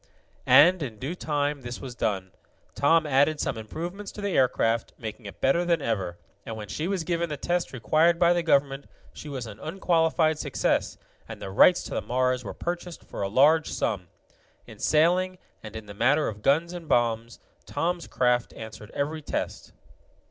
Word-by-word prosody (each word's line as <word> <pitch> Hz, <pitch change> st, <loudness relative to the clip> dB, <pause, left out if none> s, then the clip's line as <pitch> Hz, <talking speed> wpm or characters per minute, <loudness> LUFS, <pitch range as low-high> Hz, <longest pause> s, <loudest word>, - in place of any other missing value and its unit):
And, 175 Hz, +4 st, +7 dB
in 120 Hz, -7 st, -5 dB
due 135 Hz, +9 st, -4 dB
time, 145 Hz, -4 st, -1 dB
this 120 Hz, -1 st, -6 dB
was 130 Hz, -3 st, -7 dB
done. 95 Hz, -6 st, -2 dB, 0.4 s
Tom 160 Hz, +3 st, +3 dB
added 145 Hz, +2 st, +3 dB
some -, -, -1 dB
improvements 170 Hz, -, -6 dB
to -, -, -10 dB
the 200 Hz, -1 st, -1 dB
aircraft, 115 Hz, -3 st, +1 dB
making 110 Hz, -1 st, -7 dB
it 100 Hz, -, -11 dB
better 135 Hz, +7 st, +2 dB
than 170 Hz, -2 st, +2 dB
ever, 95 Hz, -9 st, -2 dB, 0.3 s
and 110 Hz, -, -6 dB
when 105 Hz, -2 st, -8 dB
she 155 Hz, +11 st, -3 dB
was 190 Hz, -3 st, -1 dB
given 170 Hz, 0 st, -1 dB
the 150 Hz, -, -4 dB
test 175 Hz, +4 st, -1 dB
required 155 Hz, +8 st, +2 dB
by 175 Hz, 0 st, +4 dB
the 175 Hz, -, +1 dB
government, 140 Hz, -3 st, +1 dB, 0.3 s
she 150 Hz, -, -9 dB
was 130 Hz, -4 st, -5 dB
an 110 Hz, -1 st, -10 dB
unqualified 165 Hz, -, +1 dB
success, -, -, 0 dB, 0.3 s
and -, -, -7 dB
the 95 Hz, -, -6 dB
rights 180 Hz, -, +5 dB
to -, -, -9 dB
the -, -, -1 dB
Mars 125 Hz, 0 st, 0 dB
were 100 Hz, -, -7 dB
purchased 175 Hz, 0 st, -5 dB
for -, -, -8 dB
a 100 Hz, -, -1 dB
large 150 Hz, +8 st, +4 dB
sum. 95 Hz, -5 st, -2 dB, 0.6 s
In -, -, -13 dB
sailing, 180 Hz, +4 st, +2 dB, 0.2 s
and 110 Hz, 0 st, -10 dB
in 110 Hz, -1 st, -7 dB
the 100 Hz, -, -9 dB
matter 135 Hz, +9 st, +2 dB
of 105 Hz, -1 st, -6 dB
guns 160 Hz, +8 st, +2 dB
and 175 Hz, -2 st, -8 dB
bombs, 115 Hz, -1 st, +1 dB, 0.3 s
Tom's 175 Hz, 0 st, -2 dB
craft 125 Hz, -1 st, +1 dB
answered 110 Hz, -1 st, -9 dB
every 155 Hz, +2 st, -2 dB
test. -, -, -4 dB
145 Hz, 185 wpm, -26 LUFS, 115-170 Hz, 0.6 s, And